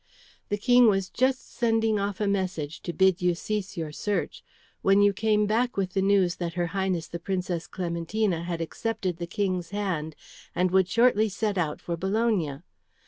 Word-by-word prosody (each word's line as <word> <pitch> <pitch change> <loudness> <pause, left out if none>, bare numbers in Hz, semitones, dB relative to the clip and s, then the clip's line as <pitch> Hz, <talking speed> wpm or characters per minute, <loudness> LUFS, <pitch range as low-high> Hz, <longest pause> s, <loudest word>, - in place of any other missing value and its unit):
The 205 - 0
King 245 +2 +5
was 195 -3 +1
just 260 +1 0
sending 225 -2 +2
off 200 -1 -2
a 210 - +1
message 185 -6 -2
to 175 - -4
bid 190 +1 +3
you 180 -1 +2
cease 200 +1 -4
your 160 -2 -3
search 205 +6 -3 0.4
when 195 +1 +4
you 205 0 +4
came 210 +1 +2
back 235 +3 0
with 190 -2 -1
the 195 - +1
news 195 -3 +3
that 170 -1 -4
her 175 -1 0
Highness 190 -4 -1
the 170 - -6
Princess 180 -2 -3
Clementina 175 +1 -1
had 170 -1 -3
accepted 190 +1 -3
the 170 0 -5
King's 185 -2 -2
hand 180 -7 -3 0.4
and 180 +1 +2
would 190 -1 +4
shortly 230 0 +4
set 205 +1 -1
out 160 -5 -1
for 170 - -3
Bologna. 190 -6 0
190 Hz, 180 wpm, -27 LUFS, 175-210 Hz, 0.4 s, King